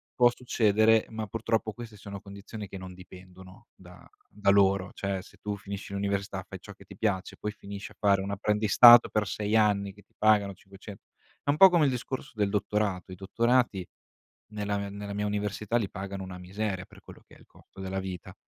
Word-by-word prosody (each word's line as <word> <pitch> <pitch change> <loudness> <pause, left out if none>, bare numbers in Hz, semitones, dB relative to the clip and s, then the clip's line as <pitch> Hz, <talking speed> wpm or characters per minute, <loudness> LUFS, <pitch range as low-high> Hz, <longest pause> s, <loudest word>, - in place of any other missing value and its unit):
può 120 -1 +5
succedere, 110 -2 +3
ma 110 -1 -5
purtroppo 110 0 -1
queste 115 -3 -10
sono 100 -1 -9
condizioni 100 +1 -9
che 95 - -8
non 95 0 -9
dipendono 95 +3 -14
da 90 -1 -16 0.2
da 100 -1 -1
loro. 100 -1 +3
Cioè, 100 -1 -3
se 100 - -18
tu 105 -1 -3
finisci 100 0 -8
l'università, 100 0 -2
fai - - -9
ciò - - -12
che - - -18
ti - - -13
piace, 100 -3 -2
poi 105 - -4
finisci 100 -1 -9
a - - -17
fare 100 -2 +3
un 100 +1 -4
apprendistato 105 +4 +7
per 105 -2 0
6 105 +3 -2
anni 100 -2 +2
che 105 - -18
ti - - -34
pagano 105 -2 +3
cinquece 95 +2 -12 0.5
è - - -4
un 145 - +2
po' 190 +1 +9
come 170 -4 +3
il 135 - +2
discorso 130 +2 -5
del 105 -2 0
dottorato: 100 -2 -1
i - - -7
dottorati 115 0 +1 0.7
nella 105 -1 -2
mia 100 0 -4
nella 100 0 -7
mia 105 +1 -2
università 105 +2 -2
li 105 -4 -2
pagano 95 -1 -6
una 90 -1 -8
miseria 95 0 -4
per - - -18
quello - - -14
che - - -18
è - - -19
il - - -19
costo - - -19
della 95 0 -3
vita. 95 -2 -7
100 Hz, 205 wpm, -28 LUFS, 95-110 Hz, 0.7 s, po